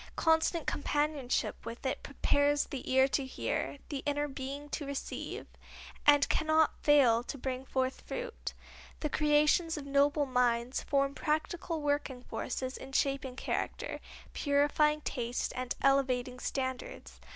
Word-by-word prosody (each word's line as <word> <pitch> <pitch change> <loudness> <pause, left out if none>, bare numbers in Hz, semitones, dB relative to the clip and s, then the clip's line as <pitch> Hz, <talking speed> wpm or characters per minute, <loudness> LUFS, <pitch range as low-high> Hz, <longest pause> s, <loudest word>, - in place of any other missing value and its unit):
Constant 320 0 +2
companionship 290 -3 -1
with 235 +4 -8
it 260 - -1
prepares 285 +1 +2
the 265 -2 -6
ear 265 +1 +6
to 275 0 0
hear, 265 +2 -3
the 280 -3 -3
inner 290 0 +1
being 275 +1 -6
to 295 - -4
receive, 280 -1 -5 0.6
and 290 -1 +7
cannot 315 0 +3
fail 265 -6 +5
to 245 - -6
bring 260 0 -3
forth 260 0 -1
fruit. - - -5 0.5
The 300 - -1
creations 300 +2 +3
of 290 - -6
noble 285 +1 +3
minds 245 -1 +1
form 275 -1 +1
practical 315 +2 -2
working 285 -3 -1
forces 260 +1 -4
in 270 0 -10
shaping 275 -2 0
character, - - -3 0.3
purifying 295 +1 +2
taste 240 -3 -2
and 255 0 -2
elevating 255 -2 +2
standards. 260 -1 -4
280 Hz, 130 wpm, -32 LUFS, 260-295 Hz, 0.6 s, and